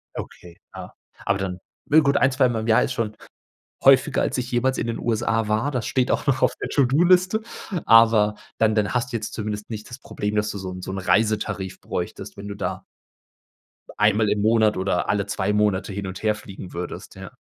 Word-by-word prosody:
Okay, 85 -1 -9 0.2
ja. - - -9 0.3
Aber 100 0 +1
dann 90 -2 -4 0.3
ja 155 +2 +7
gut 140 -1 +2
ein, 135 -1 +3
zweimal 125 -4 +1
im 110 - -5
Jahr 110 - +4
ist 130 - -2
schon 110 -3 -3 0.7
häufiger, - - +5
als - - -1
ich 125 0 -3
jemals 125 +2 +1
in - - -2
den 115 - -3
USA 115 -1 0
war, 110 +6 0
das 125 -4 -2
steht 130 -1 0
auch - - 0
noch 130 -1 +2
auf - - +3
der - - -3
To-do-Liste, 175 - +3 0.4
aber 110 -2 +5 0.2
dann 110 -1 +3
dann 105 +1 0
hast 125 +1 -1
du 115 - -1
jetzt 110 - -6
zumindest 105 -1 -5
nicht 105 -2 -7
das 125 +2 -9
Problem, 105 -4 -4
dass 105 0 +1
du 100 - -5
so 95 -1 -5
'n 90 0 -8
so 95 - -6
'n 95 - -4
Reisetarif 105 -1 0
bräuchtest, - - -5
wenn 100 +1 -8
du 100 - -6
da - - -4 1.1
einmal 105 0 +3
im 105 - 0
Monat 110 -1 +3
oder 95 -1 -1
alle 100 0 +1
2 100 0 -1
Monate 105 -1 +1
hin 100 -1 -4
und 95 +3 -8
her 105 -1 +2
fliegen 95 -3 -10
würdest, 90 +1 -7
ja. - - -9
110 Hz, 210 wpm, -23 LUFS, 100-120 Hz, 1.1 s, ja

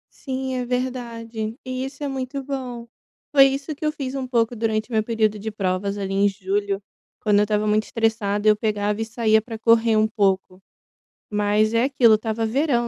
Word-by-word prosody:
Sim, 265 -1 -4
é 250 - -1
verdade, 235 -3 -4
e 255 0 -3
isso 275 +2 -7
é - - -1
muito 270 0 -4
bom. 250 -4 -5 0.5
Foi 275 -1 +8
isso 275 +3 -1
que 310 - -11
eu 305 - +2
fiz 270 -3 -5
um 265 -2 -3
pouco 235 -1 +1
durante 220 0 -1
o - - -6
meu 220 - +3
período 215 -2 0
de 220 +2 -4
provas, 200 0 -2
ali, 195 -1 -3
em 200 +1 +3
julho. 195 +1 -2 0.4
Quando 205 -1 +3
eu - - +4
estava 210 0 0
muito 215 +1 +2
estressada, 220 -2 0
eu 210 - +7
pegava 210 0 -1
e - - -1
saía 220 -1 +2
para 225 0 -7
correr 230 -1 +4
um 215 0 +4
pouco. 195 -4 0 0.7
Mas 210 +1 +2
é 230 +3 +3
aquilo, 250 -5 +5
estava 220 +1 0
verão, 240 0 +1
225 Hz, 195 wpm, -23 LUFS, 210-255 Hz, 0.7 s, Foi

